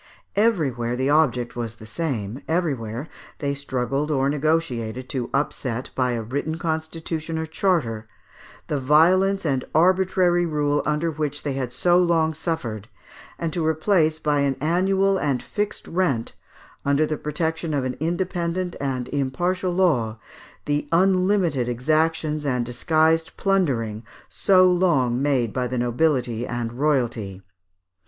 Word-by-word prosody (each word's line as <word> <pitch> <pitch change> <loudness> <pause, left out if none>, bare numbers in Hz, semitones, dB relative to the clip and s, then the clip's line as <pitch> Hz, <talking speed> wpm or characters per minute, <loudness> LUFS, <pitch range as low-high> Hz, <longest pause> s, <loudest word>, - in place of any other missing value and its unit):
Everywhere 140 - +1
the 130 +3 0
object 125 -6 +2
was 115 -2 -4
the 110 - -12
same; 115 -3 -3
everywhere 140 -7 -2 0.3
they 140 -2 -1
struggled 140 +1 -2
or 135 -2 +1
negotiated 135 -6 -1
to 125 -3 -3
upset, 130 -3 -2
by 125 -2 0
a 115 -1 -2
written 145 +7 -3
constitution 160 0 -3
or 160 - -2
charter, 150 - 0 0.6
the 150 - -2
violence 180 +8 +4
and 135 -4 0
arbitrary 180 +1 +3
rule 150 -3 +1
under 150 +2 0
which 145 -2 -3
they 145 - -2
had 130 -2 -3
so 175 +6 +3
long 165 -3 +2
suffered, 125 - -3 0.5
and 165 -2 -3
to 170 - -1
replace 160 0 +2
by 150 -2 0
an 140 -1 +1
annual 190 +5 +2
and 140 -4 -1
fixed 210 -1 -3
rent, 165 -10 0 0.5
under 140 +2 +2
the 155 - -2
protection 160 +2 -2
of 140 -3 0
an 130 0 -2
independent 175 +2 -2
and 130 -3 -2
impartial 175 +7 -1
law, 150 -12 +1 0.5
the 145 0 -1
unlimited 185 -6 +2
exactions 155 +4 0
and 125 -4 0
disguised 160 +6 +1
plundering 125 - 0 0.2
so 185 -2 +4
long 150 -9 +2
made 130 -6 +1
by 125 -1 -1
the 125 +1 -3
nobility 120 -1 0
and 120 -1 -3
royalty. 120 -8 -1
150 Hz, 135 wpm, -23 LUFS, 125-170 Hz, 0.6 s, violence